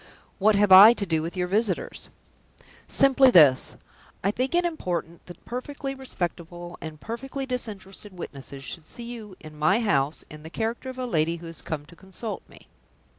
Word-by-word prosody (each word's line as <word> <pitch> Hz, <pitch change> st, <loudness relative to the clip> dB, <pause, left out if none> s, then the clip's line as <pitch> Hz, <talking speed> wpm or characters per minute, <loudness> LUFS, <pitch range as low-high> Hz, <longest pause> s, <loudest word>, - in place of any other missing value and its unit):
"What 210 Hz, +2 st, +4 dB
have 200 Hz, -1 st, +3 dB
I 200 Hz, +5 st, +11 dB
to 205 Hz, -, -3 dB
do 160 Hz, -3 st, 0 dB
with 170 Hz, +3 st, -5 dB
your 180 Hz, -, +1 dB
visitors?" 195 Hz, 0 st, -1 dB, 0.8 s
"Simply 270 Hz, -1 st, +5 dB
this. 150 Hz, -, +6 dB, 0.5 s
I 200 Hz, -, +2 dB
think 255 Hz, +8 st, -1 dB
it 350 Hz, 0 st, +3 dB
important 175 Hz, -, -3 dB
that 175 Hz, -1 st, -13 dB
perfectly 270 Hz, +3 st, -5 dB
respectable 175 Hz, -8 st, -5 dB
and 155 Hz, -1 st, -8 dB
perfectly 270 Hz, -, -5 dB
disinterested 210 Hz, -5 st, -5 dB
witnesses 140 Hz, -4 st, -8 dB
should 160 Hz, +2 st, -7 dB
see 240 Hz, -, -9 dB
you, 225 Hz, -5 st, -8 dB
in 155 Hz, 0 st, -12 dB
my 155 Hz, +8 st, +2 dB
house, 145 Hz, -, 0 dB
in 150 Hz, 0 st, -11 dB
the 160 Hz, -, -10 dB
character 225 Hz, +7 st, -3 dB
of 260 Hz, -, -8 dB
a 255 Hz, -, -3 dB
lady 165 Hz, -6 st, +1 dB
who 170 Hz, 0 st, -10 dB
has 165 Hz, -1 st, -9 dB
come 150 Hz, -2 st, -5 dB
to 170 Hz, -, -16 dB
consult 190 Hz, +4 st, -6 dB
me." -, -, -16 dB
190 Hz, 180 wpm, -25 LUFS, 165-240 Hz, 0.8 s, I